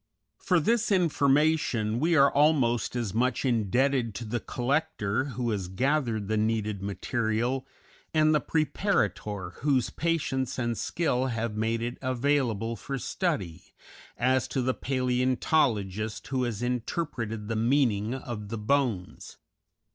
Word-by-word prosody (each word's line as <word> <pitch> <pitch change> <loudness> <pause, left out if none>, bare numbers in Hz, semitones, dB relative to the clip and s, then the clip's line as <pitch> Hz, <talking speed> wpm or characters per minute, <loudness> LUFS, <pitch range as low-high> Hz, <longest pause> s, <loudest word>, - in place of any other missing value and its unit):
For 180 - +2
this 225 +6 +1
information 145 - +2
we 165 +4 +2
are 140 -2 +5
almost 135 -7 +2
as 115 -6 -2
much 125 +4 +1
indebted 120 0 +1
to 120 - -5
the 120 +2 -2
collector 125 -4 -1
who 125 -3 -2
has 100 -4 -2
gathered 115 0 0
the 110 +1 0
needed 110 -2 0
material, 115 +6 -1 0.4
and 155 0 +4
the 150 - +3
preparator 110 - -1
whose 135 -4 +1
patience 145 -6 -1
and 120 -2 -1
skill 130 -2 0
have 115 -3 -2
made 115 +1 -1
it 120 +1 -4
available 125 -4 0
for 135 +6 -5
study, 100 - -3 0.4
as 130 +1 +2
to 130 - -1
the 130 +1 +1
palæontologist 125 - 0
who 130 -2 0
has 120 -1 -3
interpreted 120 -3 -3
the 115 - -2
meaning 115 -2 +2
of 115 -6 -6
the 115 - -3
bones. 110 -5 -1
125 Hz, 130 wpm, -28 LUFS, 110-140 Hz, 0.4 s, are